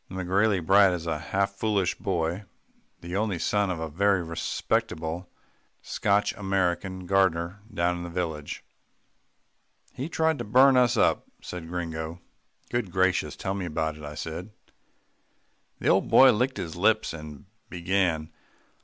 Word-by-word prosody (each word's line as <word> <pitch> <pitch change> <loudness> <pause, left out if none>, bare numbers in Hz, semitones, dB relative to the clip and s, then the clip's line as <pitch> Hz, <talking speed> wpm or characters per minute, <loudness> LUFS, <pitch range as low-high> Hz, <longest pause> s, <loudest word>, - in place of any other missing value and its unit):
The 95 - -8
McGrailey 95 0 +1
brat 95 0 +6
is 85 -2 -4
a 80 -2 -2
half 100 +5 -1
foolish 100 -2 0
boy, 90 +1 -2 0.6
the 85 +2 -6
only 100 -2 0
son 100 +4 +1
of 90 -3 -2
a 80 - -3
very 95 +4 +2
respectable, 80 +1 -2 0.5
Scotch 100 0 +1
American 95 -1 -1
gardener 95 0 +1
down 90 -2 0
in - - -6
the 85 - -6
village. 80 -4 -4 1.3
"He 135 +5 -5
tried 160 -2 +1
to - - -2
burn 130 +5 +5
us 125 -2 +4
up," - - +2 0.2
said 90 -2 -7
Gringo. 85 -1 -4 0.5
"Good 120 -6 -1
gracious! 95 -5 +1
tell 95 - -3
me 100 -2 -3
about 80 -1 -2
it," 75 - -12
I 75 0 -7
said. 80 +6 -6 1.3
The - - 0
old - - +3
boy 130 -1 +8
licked 125 +4 0
his 80 -3 -5
lips 110 +3 +2
and 75 -3 -9 0.2
began. 85 -3 0
90 Hz, 145 wpm, -27 LUFS, 85-100 Hz, 1.3 s, boy